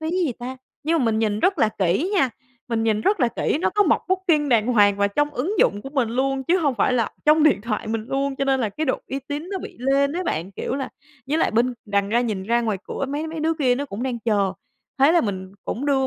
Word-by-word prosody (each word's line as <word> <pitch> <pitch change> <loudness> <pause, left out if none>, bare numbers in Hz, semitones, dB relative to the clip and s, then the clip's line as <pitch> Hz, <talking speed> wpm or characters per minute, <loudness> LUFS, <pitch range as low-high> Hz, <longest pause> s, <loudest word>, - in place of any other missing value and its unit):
phí 315 +1 -2
gì 350 -7 0
ta?" 255 +2 -6 0.3
nhưng 325 +2 +1
mà 255 - +1
mình 220 -1 +1
nhìn 215 -1 0
rất 380 -4 +2
là 220 - +4
kỹ 195 - +1
nha, 270 -10 +3 0.4
mình 225 -1 0
nhìn 220 -2 +1
rất 395 - +1
là 245 - +4
kỹ 255 +5 -1
nó - - +1
có 415 - +3
mộc - - +2
Booking 345 -6 +2
đàng 230 -3 +3
hoàng 205 -5 +4
và 200 0 +2
trong 295 +8 0
ứng 315 - -2
dụng 205 +1 +2
của 270 - -8
mình 265 -6 0
luôn 265 +2 -1
chứ 360 +6 +3
hông 285 -6 +1
phải 255 - +2
là 235 -3 +1
trong 305 +1 +5
điện 305 -9 +4
thoại 215 -1 -3
mình 220 0 -2
luôn 275 0 -1
cho 275 - 0
nên 270 -1 +2
là 220 - 0
cái 310 +10 -3
độ 260 - 0
uy 270 - -2
tín 295 +5 -4
nó 390 - -2
bị - - -9
lên 275 +2 +2
ấy 360 +2 -3
bạn. 175 - -3
Kiểu - - -3
là 270 -1 -3 0.4
với 305 +3 0
lại - - +2
bên 240 +3 +1
đằng 200 -1 0
ra 235 +3 +2
nhìn 215 -6 -2
ra 235 +4 +1
ngoài 220 -4 -1
cửa - - -4
mấy 295 +3 -3
mấy 320 0 -5
đứa 320 +1 +1
kia 260 -6 +2
nó 280 +3 -3
cũng 235 -3 -6
đang 250 -3 -2
chờ, 205 -4 +1 0.5
thế 280 +5 +5
là 345 - +5
mình 190 -3 -4
cũng 270 +5 -3
đưa 270 -2 +2
260 Hz, 275 wpm, -23 LUFS, 220-300 Hz, 0.5 s, trong